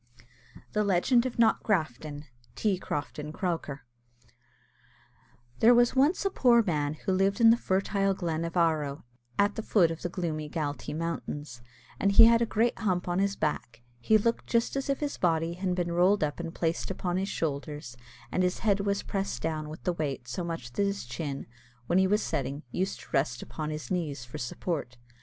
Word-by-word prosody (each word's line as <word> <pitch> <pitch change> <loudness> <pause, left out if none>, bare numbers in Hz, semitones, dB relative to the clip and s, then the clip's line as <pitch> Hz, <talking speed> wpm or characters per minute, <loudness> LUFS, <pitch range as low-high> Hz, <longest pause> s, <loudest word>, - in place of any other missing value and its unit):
THE 210 - +2
LEGEND 210 +6 +3
OF 250 - -7
KNOCKGRAFTON. 155 - +1 0.3
T. 200 -4 0
CROFTON 150 -2 -4
CROCKER. 160 -6 -3 1.8
There 240 +2 +7
was 240 +1 +4
once 290 +9 +3
a 390 - +2
poor 240 -8 +5
man 150 -6 -1
who 190 - -3
lived 195 +1 +2
in 225 -1 +8
the - - +6
fertile 195 -2 0
glen 165 -3 -2
of 170 +1 -3
Aherlow, 155 -4 +1 0.3
at 205 0 +3
the - - -4
foot 180 -6 +3
of 165 - -6
the 175 - -2
gloomy 160 -4 -3
Galtee 145 -1 -3
mountains, 150 -6 -4 0.4
and 200 0 +2
he 225 +3 +10
had 230 0 +5
a 235 - +2
great 230 +3 +1
hump 185 -5 0
on 175 +1 0
his 200 0 +1
back: 135 -7 -3 0.2
he 215 - +4
looked 230 +2 -1
just 235 +2 +1
as 275 0 -2
if 275 - 0
his 290 -1 -3
body 165 -1 +1
had 180 0 -2
been 175 -1 -1
rolled 180 +2 +3
up 145 +1 -2
and 165 -1 -5
placed 165 0 -1
upon 180 -1 -2
his 195 +1 -1
shoulders; 145 -3 -4 0.4
and 185 - +1
his 180 0 +1
head 200 -2 +3
was 200 0 0
pressed 195 -11 -3
down 155 -1 -2
with 155 - -9
the 180 - 0
weight 140 -7 -3
so 150 +9 -3
much 165 -8 -5
that - - -1
his 200 -4 -1
chin, 140 +3 -5 0.4
when 175 +8 +3
he 190 - +4
was 210 +2 +2
sitting, 140 0 -3
used 190 +6 -2
to - - -15
rest 120 -3 0
upon 155 -1 -5
his 155 +3 -6
knees 150 -8 -2
for 120 - -8
support. 125 0 -4
175 Hz, 190 wpm, -29 LUFS, 150-200 Hz, 1.8 s, he